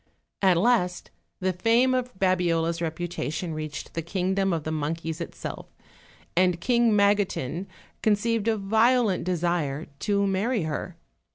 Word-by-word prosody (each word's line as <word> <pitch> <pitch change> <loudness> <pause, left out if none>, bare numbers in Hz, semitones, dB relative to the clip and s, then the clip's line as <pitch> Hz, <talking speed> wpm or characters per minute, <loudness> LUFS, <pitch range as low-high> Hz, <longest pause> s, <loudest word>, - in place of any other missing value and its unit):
At 190 -3 +4
last 180 -3 +1 0.3
the 185 0 +1
fame 230 +8 +3
of 250 -1 -1
Babiola's 170 -3 +1
reputation 170 0 -3
reached 155 -1 -6
the 165 - -2
kingdom 190 +3 0
of 165 -3 -1
the 155 - -3
monkeys 160 +2 -3
itself, 170 - -6 0.7
and 180 -1 +3
King 235 +3 +3
Magotin 200 -5 +1 0.3
con 215 -1 +4
ceived 230 +1 -1
a 225 -1 +2
violent 220 -1 +2
desire 170 -5 -1
to 200 -1 +1
marry 200 +2 0
her. 160 +3 -4
185 Hz, 130 wpm, -26 LUFS, 165-210 Hz, 0.7 s, At